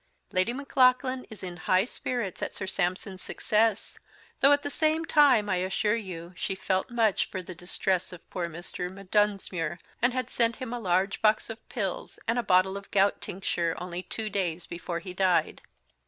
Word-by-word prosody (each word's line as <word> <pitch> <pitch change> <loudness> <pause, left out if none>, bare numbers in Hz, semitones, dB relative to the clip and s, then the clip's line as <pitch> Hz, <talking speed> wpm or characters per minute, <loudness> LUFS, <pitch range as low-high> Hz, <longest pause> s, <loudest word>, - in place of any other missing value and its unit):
Lady 185 +3 +2
Maclaughlan 255 -1 +2
is 220 - -11
in 180 -1 -5
High 185 +2 +3
spirits 240 -5 -3
at - - -3
Sir 190 - -4
Sampson's 185 0 -2
Success, 220 0 0 0.4
though, 275 - +6
at 290 0 +4
the 285 - -3
Same 315 +2 +1
Time, 280 -10 +5
I 185 -3 +1
assure 190 +3 +1
you, 180 -5 -6
she 195 - -2
Felt 190 +2 0
much 230 -4 +2
for 185 -2 -5
the 185 - -8
Distress 180 +1 -1
of 180 - -12
poor 175 -2 -2
Mr. 175 +1 -6
M'Dunsmuir, 195 -3 0 0.2
and 245 +2 +4
had 255 0 -3
sent 230 -1 +2
him 255 -3 -5
a 245 - -3
Large 190 -1 +1
Box 215 +1 +3
of 225 - -8
Pills, 195 -6 -3
and 230 +2 +2
a - - +3
Bottle 190 -2 +3
of 200 - -10
Gout 200 0 +3
Tincture, 175 -3 -2
only 180 0 -5
two 220 +3 -4
days 180 -4 -1
before 170 0 -4
he 185 -1 -7
died. 185 -1 +2
195 Hz, 185 wpm, -28 LUFS, 180-230 Hz, 0.4 s, though